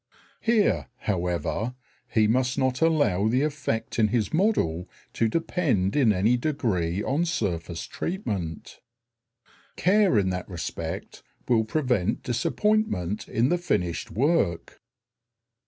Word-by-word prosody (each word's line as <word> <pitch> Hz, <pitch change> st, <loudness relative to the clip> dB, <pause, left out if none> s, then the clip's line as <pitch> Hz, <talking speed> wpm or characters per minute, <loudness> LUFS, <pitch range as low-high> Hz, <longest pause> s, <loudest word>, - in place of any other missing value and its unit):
Here, 225 Hz, -3 st, +2 dB
however, 90 Hz, +4 st, -1 dB, 0.4 s
he 110 Hz, -3 st, +3 dB
must 125 Hz, +3 st, +1 dB
not 130 Hz, -1 st, 0 dB
allow 130 Hz, -, +3 dB
the 125 Hz, +5 st, +2 dB
effect 145 Hz, -8 st, -2 dB
in 110 Hz, -, +5 dB
his 110 Hz, -2 st, -1 dB
model 95 Hz, -, +1 dB, 0.2 s
to 115 Hz, -, +1 dB
depend 130 Hz, -, 0 dB
in 130 Hz, -7 st, +4 dB
any 105 Hz, +5 st, +2 dB
degree 105 Hz, -, -1 dB
on 145 Hz, +5 st, +1 dB
surface 85 Hz, -, -2 dB
treatment. 100 Hz, -, -4 dB, 1.0 s
Care 195 Hz, -, +3 dB
in 95 Hz, -2 st, +2 dB
that 90 Hz, +1 st, -4 dB
respect 85 Hz, -3 st, -5 dB, 0.3 s
will 115 Hz, -3 st, +3 dB
prevent 120 Hz, -, 0 dB
disappointment 125 Hz, -, 0 dB
in 120 Hz, +4 st, +1 dB
the 175 Hz, -, +1 dB
finished 90 Hz, -, -1 dB
work. 110 Hz, -, 0 dB
115 Hz, 115 wpm, -26 LUFS, 90-155 Hz, 1.0 s, in